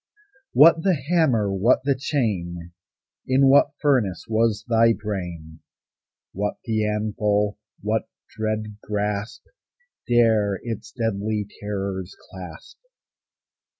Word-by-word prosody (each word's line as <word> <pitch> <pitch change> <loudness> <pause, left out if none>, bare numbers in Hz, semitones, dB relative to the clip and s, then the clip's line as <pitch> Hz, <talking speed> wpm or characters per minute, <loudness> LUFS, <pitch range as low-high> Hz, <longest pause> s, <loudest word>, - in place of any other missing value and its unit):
What 160 +5 +7
the 185 0 +2
hammer? 135 - +1
what 110 +7 +3
the 140 0 +2
chain? 90 - -2 0.6
In 130 +1 +4
what 140 +1 +5
furnace 125 -11 +1
was 110 -1 +1
thy 115 -1 +4
brain? 90 -7 -6 0.7
What 105 +2 -2
the 110 -2 0
anvil? 105 -1 0 0.2
what 110 +1 -1 0.3
dread 110 -1 -3
grasp 105 +1 -3 0.6
Dare 110 -5 +3
its 115 -3 -6
deadly 110 -2 -2 0.2
terrors 100 -2 -4 0.2
clasp? 90 -4 -11
105 Hz, 100 wpm, -23 LUFS, 100-120 Hz, 0.7 s, What